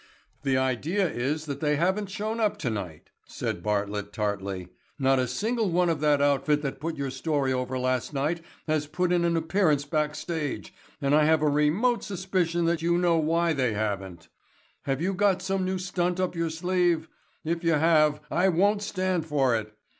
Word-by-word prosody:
"The 135 -2 +1
idea 145 - +1
is 150 +3 -2
that 140 -2 -5
they 150 -1 +1
haven't 190 +6 0
shown 215 +3 -3
up 215 -2 +1
tonight," 100 -10 -5 0.2
said 85 - -4
Bartlett 105 0 -2
tartly. 100 -3 -3 0.3
"Not 135 -1 +3
a 125 - +1
single 220 - -1
one 175 0 +2
of 160 - -2
that 145 -1 +3
outfit 145 +1 +2
that 135 -2 -3
put 165 +2 -4
your 140 -1 -3
story 135 -1 0
over 130 0 -2
last 130 -1 -1
night 150 +4 -1 0.2
has 155 -2 0
put 180 +4 -1
in 175 -1 +2
an 170 -1 +2
appearance 160 -3 +1
back 150 0 -1
stage, 155 -2 -4 0.3
and 140 +1 +2
I 150 0 +5
have 160 0 +3
a - - +3
remote 155 +12 +2
suspicion 180 -3 -1
that 170 -1 +1
you 170 +1 +2
know 175 -1 +3
why 165 +1 +2
they 130 -6 0
haven't. 95 -5 -3 0.6
Have 135 +3 -1
you 195 +2 0
got 195 -1 +2
some 190 0 -1
new 185 0 -1
stunt 180 -1 -1
up 185 -1 0
your 165 -1 -1
sleeve? 175 0 +1 0.4
If 170 +2 -1
you 165 -1 +3
have 155 -1 +3
I 185 +2 +3
won't 200 +4 +2
stand 185 -5 -1
for 135 -5 +2
it. 110 -1 -3
155 Hz, 185 wpm, -27 LUFS, 135-180 Hz, 0.6 s, I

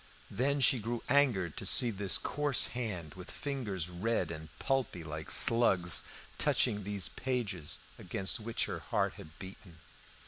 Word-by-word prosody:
Then 140 +6 0
she 130 -1 +4
grew 115 +2 -4
angered 120 - +2
to - - -5
see 120 -2 +5
this 100 -2 0
coarse 145 -3 0
hand, 105 -11 -4
with 90 -1 -11
fingers 110 - -4
red 90 0 -2
and 80 -1 -8
pulpy 135 -10 -2
like 80 0 -7
slugs, 95 -7 +5 0.4
touching 105 - +2
these 100 -2 -1
pages 110 - -4 0.2
against 95 +4 -2
which 115 +1 -2
her - - -5
heart - - -1
had 80 +1 -13
beaten. 95 -2 -11
100 Hz, 145 wpm, -32 LUFS, 90-125 Hz, 0.4 s, see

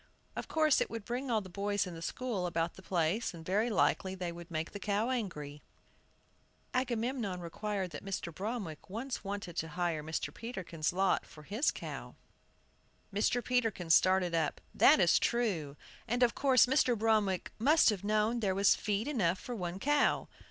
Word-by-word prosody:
"Of - - -5
course, 310 -2 +3
it - - 0
would 225 -2 -6
bring 250 +3 -3
all 225 -2 +2
the - - -12
boys 200 +2 -1
in 180 - -7
the 165 - -8
school 210 -2 -2
about 170 -1 -1
the - - -13
place, 180 +3 0
and 165 -1 -10
very 210 +6 +1
likely 190 -3 +1
they 180 -2 -3
would 170 +1 -10
make 160 -1 -3
the 205 - -7
cow 210 +4 0
angry." 150 - -4 1.1
Agamemnon 240 -5 -1
recalled 190 +2 -3
that 145 - -7
Mr. 190 -3 -4
Bromwick 195 -5 -5
once 240 +6 -4
wanted 195 -4 -5
to 160 - -1
hire 170 -3 0
Mr. 160 +1 -3
Peterkin's 185 -9 -3
lot 190 +1 +2
for 150 - -14
his 215 - +1
cow. - - -6 1.0
Mr. 230 +4 +1
Peterkin 225 -9 0
started 185 0 +4
up. 160 -3 0
"That - - +6
is 175 -3 +5
true; 180 -12 0 0.3
and 245 +2 +2
of 235 -1 +4
course 265 -3 +5
Mr. 250 -2 +3
Bromwick 210 -4 +1
must 290 +2 +5
have 200 -3 -4
known 215 +3 +1
there 195 -4 0
was 200 0 +5
feed 210 +3 -1
enough 190 - +1
for 250 - -6
one 180 -3 -4
cow." 290 +7 +2
200 Hz, 175 wpm, -32 LUFS, 175-235 Hz, 1.1 s, That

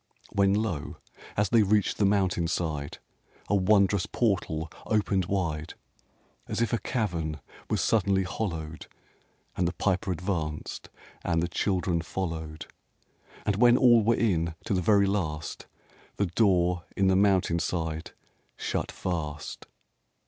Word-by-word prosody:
When, 100 0 +3
lo, 105 -9 -2 0.4
as 105 -1 +2
they 115 -1 +5
reached 105 0 +2
the 100 - +3
mountain 95 -4 +1
side, 75 -4 -2 0.5
A 100 - +3
wondrous 100 -1 +3
portal 85 -8 -1 0.2
opened 100 -4 +1
wide, 85 -5 -2 0.7
As - - -3
if 115 +1 +1
a 115 - +2
cavern 85 - -2 0.3
was - - +1
suddenly 100 -3 +2
hollowed; 80 -5 -4 0.7
And 90 - +1
the 90 - -2
Piper 95 +1 0
advanced 85 -4 -3 0.3
and 85 -1 +1
the - - 0
children 90 -1 0
followed; 80 -4 -4 0.8
And 100 -2 +1
when 120 +2 +6
all 120 -3 +6
were 115 +2 +3
in, 85 -8 +1
to 110 - 0
the 90 - +1
very 100 +2 +4
last, 80 -7 -2 0.5
The 100 - +1
door 90 -2 +2
in 95 - +3
the 95 - +4
mountain 95 -3 +3
side 80 -1 -2 0.5
shut - - -2
fast. 75 -5 -4
95 Hz, 135 wpm, -28 LUFS, 80-100 Hz, 0.8 s, when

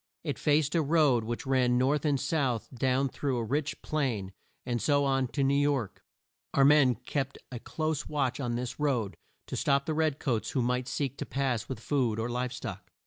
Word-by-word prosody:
It - - -3
faced 150 -1 +2
a 165 - +3
road 145 -6 +3
which 120 +1 -4
ran 130 -2 +3
north 135 +4 +2
and 145 -3 +2
south 140 -6 0
down 130 +2 +1
through 135 0 -2
a 115 - -1
rich 140 +5 -2
plain, 120 -11 -1 0.3
and 120 -2 -1
so 145 -1 +3
on 135 -1 +1
to 140 +3 -1
New 135 +1 +3
York. 140 -6 0 0.5
Our 135 - +6
men 140 -4 +6
kept 135 +2 -3
a 125 - -5
close 155 +3 -2
watch 135 -4 0
on 120 -3 -1
this 125 +2 -4
road, 125 -9 0 0.3
to - - -5
stop 140 0 +2
the 160 - -1
red 155 -2 +1
coats 120 -8 -1
who 130 - 0
might 125 +1 0
seek 140 -2 -2
to - - -3
pass 130 -4 -1
with 130 -4 -4
food 120 -3 0
or 115 +2 -2
live 125 +1 -2
stock. 125 - -7
135 Hz, 200 wpm, -29 LUFS, 125-145 Hz, 0.5 s, Our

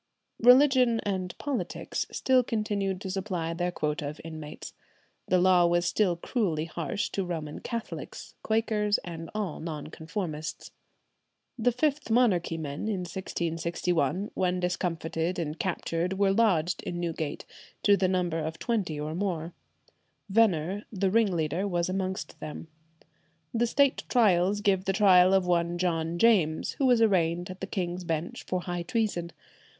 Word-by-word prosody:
Religion 250 -1 +6
and 190 -3 -3
politics 285 -4 -3
still 260 -1 +3
continued 205 -5 -1
to 190 -1 -5
supply 185 -4 -2
their 175 +1 -1
quota 150 -2 -2
of 150 - -9
inmates. 155 -2 -8 0.5
The 185 - +3
law 180 -1 +5
was 175 +1 +2
still 180 -1 +2
cruelly 170 -4 -1
harsh 175 +6 -3
to 195 - -1
Roman 160 -4 -5
Catholics, 230 -1 -6
Quakers, 215 -2 +1
and 165 -2 -7
all 205 -7 -3
Non 155 -2 -6
conformists. 160 -2 -5 0.8
The 245 0 +2
Fifth 290 +3 0
Monarchy 210 -9 +2
men 150 +4 -4
in 200 -4 -1
1661, 170 0 -2
when 180 -1 0
discomfited 170 -1 -2
and 160 -2 -3
captured, 175 -1 -1
were 200 -1 +3
lodged 185 -6 +2
in 175 - -4
Newgate, 165 -3 -3 0.4
to 205 - +6
the 190 -1 +1
number 180 -3 0
of 160 +1 -4
twenty 195 -10 -1
or 150 +1 -3
more. 175 -2 -2 0.8
Venner, 195 -2 +2
the 195 -2 0
ringleader, 185 -4 +1
was 175 -2 0
amongst 190 0 -3
them. 155 +1 -7 0.8
The 235 0 +2
State 280 +3 +2
Trials 205 -4 +3
give 195 -2 +2
the 195 - +1
trial 185 -2 +6
of 190 -1 +3
one 175 -1 +1
John 170 -2 -1
James, 175 -7 +3
who 270 - +3
was 240 -2 +5
arraigned 175 -3 +1
at 185 - -11
the 190 - -3
King's 180 -2 -3
Bench 165 -1 -3
for 185 -1 -1
high 175 0 -3
treason. 205 -5 -1
180 Hz, 145 wpm, -28 LUFS, 165-205 Hz, 0.8 s, Religion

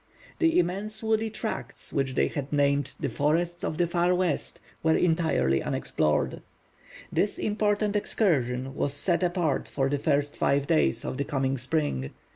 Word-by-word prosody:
The 330 -1 +3
immense 200 +5 -1
woody 220 0 +1
tracts 220 0 -5
which 135 -2 0
they - - +3
had 140 -1 -5
named 140 -1 +1
the - - -1
Forests 170 +4 0
of 155 - -2
the 175 - +3
Far 175 +1 +2
West 180 -5 -1 0.2
were 160 0 +3
entirely 160 - +2
unexplored. 75 0 0 0.7
This 205 - 0
important 210 0 0
excursion 135 - 0
was 140 0 -2
set 170 +5 0
apart 175 -4 0
for 135 -1 0
the 145 0 0
first 145 0 +1
five 140 0 +2
days 70 - +2
of - - -3
the 140 - 0
coming 135 -1 -1
spring. 130 - -1
155 Hz, 155 wpm, -27 LUFS, 135-180 Hz, 0.7 s, The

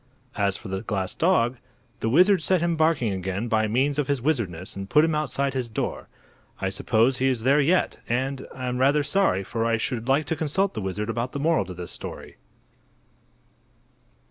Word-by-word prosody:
As 100 -3 0
for 110 - -10
the 95 0 -3
glass 100 -4 -3
dog, 130 -9 +2 0.4
the 110 - -1
wizard 180 - +5
set 185 +3 +2
him 170 0 0
barking 155 -9 +2
again 95 +4 -3
by 110 -2 +1
means 135 +6 +1
of 145 - 0
his 140 -2 0
wizardness 110 - -2
and 95 0 -6
put 150 +1 +5
him 165 - 0
outside 140 -2 -1
his 125 -3 -2
door. 110 - -3 0.5
I - - -1
suppose 120 +4 +1
he 130 - +1
is 125 -4 0
there 140 +4 +4
yet, 175 +6 +1
and 130 +3 -2
am 125 -1 -3
rather 140 +3 +3
sorry, 165 - +2
for 115 +4 -3
I 115 0 +2
should 115 0 -3
like 140 +3 +2
to 160 - -1
consult 160 +6 0
the 110 - -4
wizard 105 +3 -3
about 120 +4 -3
the 140 - -3
moral 155 -7 +2
to 90 -1 -8
this 90 0 -7
story. - - -8
130 Hz, 195 wpm, -25 LUFS, 110-150 Hz, 0.5 s, wizard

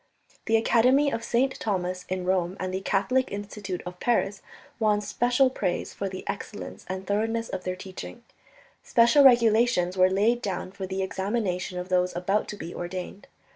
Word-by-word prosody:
The 225 0 +4
Academy 255 +6 +3
of 230 - -3
St. 260 +3 0
Thomas 180 -3 -2
in 185 -1 -2
Rome 185 0 0
and 185 0 -3
the 190 - -2
Catholic 250 +7 +1
Institute 200 -2 -5
of 180 0 -8
Paris 205 -4 0 0.4
won 210 -2 +3
special 245 +5 +2
praise 185 -8 -2
for 195 - -3
the 185 0 -7
excellence 205 +1 -6
and 190 +1 -4
thoroughness 225 +3 -1
of 185 - -5
their 185 0 -2
teaching. 185 - -9 0.6
Special 240 +5 +5
regulations 230 -7 +4
were 185 0 +5
laid 215 +6 +2
down 190 -3 -3
for 190 -1 -6
the 190 0 -2
examination 190 -2 -2
of 180 +1 -5
those 180 -1 +1
about 195 +4 0
to 210 - -6
be 170 - -7
ordained. 180 +2 -6
195 Hz, 170 wpm, -26 LUFS, 185-230 Hz, 0.6 s, Special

